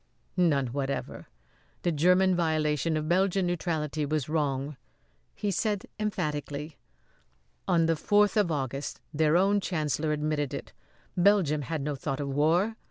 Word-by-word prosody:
"None 155 -7 +3
whatever! 140 -1 -3 0.6
The 175 - +2
German 180 +4 +4
violation 155 -2 +1
of 155 0 -3
Belgian 190 +2 +2
neutrality 160 -4 -1
was 150 -2 -1
wrong," 145 -2 -1 0.6
he 205 - -1
said 205 +1 -1
emphatically. 150 -7 -3 0.9
"On 165 -2 +3
the 165 0 +2
fourth 205 +5 +3
of 205 -6 +2
August 135 -1 -3
their 155 +2 +3
own 200 +2 +3
chancellor 155 -4 -1
admitted 150 -2 -1
it. - - -8 0.4
Belgium 180 -5 +3
had 150 +1 -3
no 145 0 -2
thought 135 +1 -3
of 140 -1 -3
war. 165 +10 +2
155 Hz, 135 wpm, -28 LUFS, 145-180 Hz, 0.9 s, German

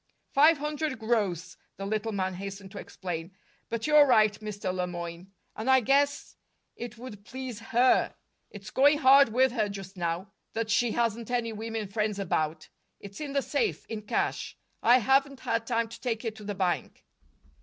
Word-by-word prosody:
"Five 305 +3 +6
hundred 300 -1 -2
gross," 205 -6 -1 0.2
the 195 - -5
little 215 +2 -1
man 190 -2 -1
hastened 195 +1 -7
to - - -7
explain. 175 0 -6 0.3
"But 230 -1 -3
you're 300 -1 +6
right, 215 -5 +5
Mr. 205 -3 -4
Le 180 -1 -1
Moyne. 175 +1 -7 0.2
And 220 +4 -3
I 260 0 +7
guess 280 +4 +1 0.4
it 240 0 -7
would 225 -4 -10
please 255 -1 -7
HER. 240 +3 +2 0.3
It's 205 0 -10
going 285 +3 +5
hard 275 -2 +7
with 255 +3 +3
her, 220 -4 0
just 195 -1 -8
now, 175 +3 -2 0.2
that 225 -1 -2
she 235 +1 +2
hasn't 230 -1 -1
any 240 -2 -1
women 220 0 -4
friends 210 +1 -1
about. 160 -5 -1 0.3
It's 200 +4 -10
in 290 -2 -4
the 275 -1 +1
safe, 285 - -1
in 220 -2 -5
cash; 210 - -2 0.2
I 240 +2 +6
haven't 270 +2 +2
had 230 0 -1
time 230 -2 +1
to 230 - -11
take 235 -2 -2
it 220 -1 -3
to 215 - -10
the 205 0 -4
bank." 185 -2 -2
220 Hz, 175 wpm, -28 LUFS, 195-255 Hz, 0.4 s, I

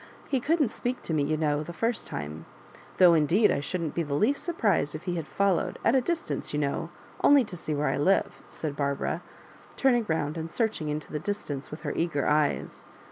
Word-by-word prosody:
He 270 - +2
couldn't 295 0 +2
speak 245 +2 -3
to 165 - -3
me, 155 - +2
you 155 +2 0
know, 150 -1 +1
the 165 +3 -7
first 230 +5 -1
time; 75 +2 -6 0.5
though 180 -2 +7
indeed 165 +7 +4
I - - +1
shouldn't 165 +1 -3
be 170 - 0
the 145 -3 -2
least 245 - +1
surprised 205 - +1
if 155 - -7
he 180 - -2
had 165 -3 -4
followed 200 -3 +1
— - - -11
at 230 - +5
a 265 - +4
distance, 330 - -2
you - - +1
know, 150 +3 -1 0.3
only 285 -2 +7
to 205 -5 -8
see 155 -2 -3
where 145 +1 0
I - - +1
live," 190 +7 +1
said 150 -3 -4
Barbara, 140 +3 -1 0.5
turning 240 -5 +2
round 155 0 -1
and 160 +1 -5
searching 215 -10 -1
into 150 +1 -4
the 150 - -2
distance 155 -6 -4
with 150 - -8
her - - -3
eager 160 -4 0
eyes. 150 -1 0
165 Hz, 215 wpm, -28 LUFS, 150-215 Hz, 0.5 s, though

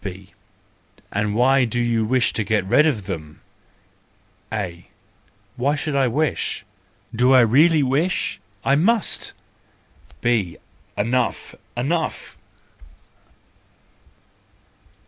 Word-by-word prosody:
B: 95 -1 -8 0.8
And 105 +1 -1
why 130 +3 +4
do 120 0 -1
you 120 -2 +1
wish 125 +2 +1
to 110 - -1
get 105 -2 0
rid 150 +11 +4
of 110 -11 -1
them? 80 -6 -7 1.1
A: 90 -5 -5 0.7
Why 140 +4 +1 0.2
I 135 -2 +2
wish? 150 +6 -1 0.5
Do 125 +3 +4
I 130 - +8
really 150 +7 +4
wish! 145 +8 0 0.3
I 135 - +3
must.—B: 120 - -2 0.4
Enough! 120 +3 -1 0.2
Enough! 155 +6 -2
120 Hz, 90 wpm, -22 LUFS, 105-140 Hz, 1.1 s, I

